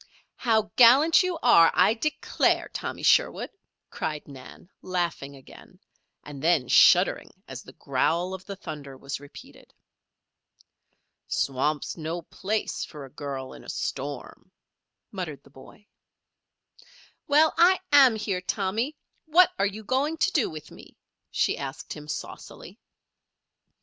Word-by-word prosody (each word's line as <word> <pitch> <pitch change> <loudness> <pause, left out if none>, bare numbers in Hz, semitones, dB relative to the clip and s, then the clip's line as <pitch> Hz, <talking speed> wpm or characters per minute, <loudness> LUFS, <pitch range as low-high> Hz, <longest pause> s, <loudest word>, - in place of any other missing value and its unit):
"How 220 -3 0
gallant 270 +7 +7
you 365 -2 -2
are, 165 0 +6
I 185 +4 +4
declare, 295 +7 0
Tommy - - -6
Sherwood," - - +2 0.4
cried 150 -1 -5
Nan, 135 +3 -13
laughing 170 -6 -3
again, 135 - -16 0.4
and 145 -2 -10
then 160 -6 +2
shuddering - - +4 0.2
as - - -8
the - - -15
growl 175 +3 -1
of 190 -1 -8
the 200 - -7
thunder 140 -7 -9
was 140 +1 -6
repeated. 145 0 -15 1.5
"Swamp's 140 +4 -2
no 165 +1 -5
place 210 +6 -3
for 150 -3 -9
a 135 - -15
girl 135 -2 -6
in - - -13
a - - -11
storm," 140 -1 -6 0.6
muttered 175 -7 -6
the 140 - -21
boy. 140 +9 -16 1.4
"Well, 305 +2 +4
I 355 +3 +5
am 270 -5 +7
here, 200 -4 -3
Tommy; 215 +10 -2 0.3
what 345 +3 +5
are 200 - +3
you 210 +2 -7
going 275 +8 -1
to 365 - +1
do 295 -9 +1
with 155 -1 -10
me?" - - -15 0.3
she - - 0
asked 135 -1 -7
him, 150 -1 -11
saucily. 150 -1 -8
180 Hz, 130 wpm, -26 LUFS, 145-235 Hz, 1.5 s, gallant